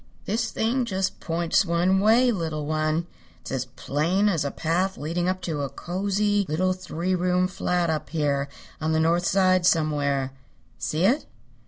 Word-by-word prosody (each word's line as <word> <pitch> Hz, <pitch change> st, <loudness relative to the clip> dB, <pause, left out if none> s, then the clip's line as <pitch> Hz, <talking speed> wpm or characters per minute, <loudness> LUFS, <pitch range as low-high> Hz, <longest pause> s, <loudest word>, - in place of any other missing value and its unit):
"This 225 Hz, +3 st, -1 dB
thing 245 Hz, +4 st, 0 dB
just 190 Hz, -3 st, -2 dB
points 165 Hz, -1 st, +1 dB
one 180 Hz, +2 st, +2 dB
way, 230 Hz, +5 st, +5 dB
little 160 Hz, -7 st, -3 dB
one. 155 Hz, +2 st, 0 dB, 0.4 s
It's -, -, -9 dB
just 130 Hz, -1 st, -2 dB
as -, -, -29 dB
plain 175 Hz, +8 st, +1 dB
as 165 Hz, -7 st, 0 dB
a 140 Hz, -, -1 dB
path 180 Hz, +6 st, -1 dB
leading 170 Hz, +4 st, -1 dB
up 185 Hz, 0 st, -2 dB
to 155 Hz, -4 st, -2 dB
a 140 Hz, -, -2 dB
cozy 200 Hz, +5 st, 0 dB
little 185 Hz, +5 st, +1 dB
three 185 Hz, 0 st, -3 dB
room 180 Hz, 0 st, +2 dB
flat 180 Hz, -2 st, 0 dB
up 155 Hz, -2 st, -3 dB
here 145 Hz, -3 st, 0 dB, 0.3 s
on 160 Hz, +1 st, 0 dB
the 160 Hz, -, +2 dB
North 170 Hz, +2 st, +2 dB
Side 185 Hz, -2 st, +3 dB
somewhere. 145 Hz, -5 st, +1 dB, 0.5 s
See 160 Hz, +4 st, 0 dB
it? 250 Hz, +9 st, +2 dB
175 Hz, 170 wpm, -25 LUFS, 155-190 Hz, 0.5 s, way